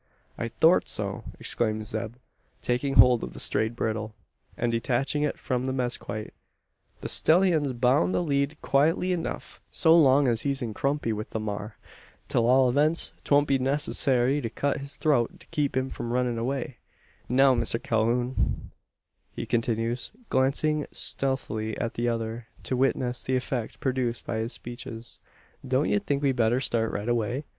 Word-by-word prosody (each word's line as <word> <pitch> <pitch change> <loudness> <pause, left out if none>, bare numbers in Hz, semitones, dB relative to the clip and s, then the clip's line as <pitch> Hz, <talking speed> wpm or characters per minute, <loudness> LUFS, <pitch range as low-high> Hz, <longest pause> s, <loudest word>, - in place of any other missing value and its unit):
"I - - -3
thort - - +3
so," - - -3
exclaims 110 -2 -2
Zeb, 110 +1 -4 0.5
taking 130 +3 0
hold 125 -2 +6
of - - -6
the - - -9
strayed 110 +2 0
bridle, 110 -1 -3 0.4
and 120 - 0
detaching 125 +5 0
it 150 - 0
from 125 -1 -2
the 130 - -1
mezquite; 120 -4 -3 0.7
"the - - -4
stellyun's 160 -5 +4
boun 125 +8 +2
to - - +2
lead 140 -1 0
quietly 160 +6 +2
enuf 170 -2 -4
so 165 -1 +4
long 140 -3 +5
as 115 -2 +1
he's 140 0 0
in 115 -2 -4
kumpny 140 -2 -1
with 105 0 -5
the 110 - -3
maar. 105 0 -5 0.5
'T - - +2
all 125 +3 +4
events, 150 +6 +2
'twon't 145 0 +3
be 135 -1 +2
needcessary 135 0 +1
to 115 - -3
cut 140 +6 -1
his 140 0 -8
throat 150 +3 +1
to 170 - -17
keep 150 -5 0
him 130 0 -1
from 120 0 -5
runnin' 125 -1 0
away. 130 +2 -3 0.5
Now, 135 +2 +5
Mister 120 -1 0
Calhoun," 120 +3 0 0.6
he - - -4
continues, 115 +1 -1 0.2
glancing 145 +3 +1
stealthily 110 -5 -2
at 115 - -2
the 120 +1 0
other, 115 0 -3 0.2
to 130 - -1
witness 125 -1 0
the 130 - 0
effect 125 -3 -3
produced 125 -3 -1
by 110 - -2
his 110 +2 -2
speeches; 120 -2 -8 0.5
"don't 130 +3 +1
ye 205 - +3
think 145 -8 -2
we'd 135 -2 +2
better 120 +2 +3
start 115 -4 0
right 105 +2 -4
away? 120 +3 0
125 Hz, 165 wpm, -27 LUFS, 115-140 Hz, 0.7 s, hold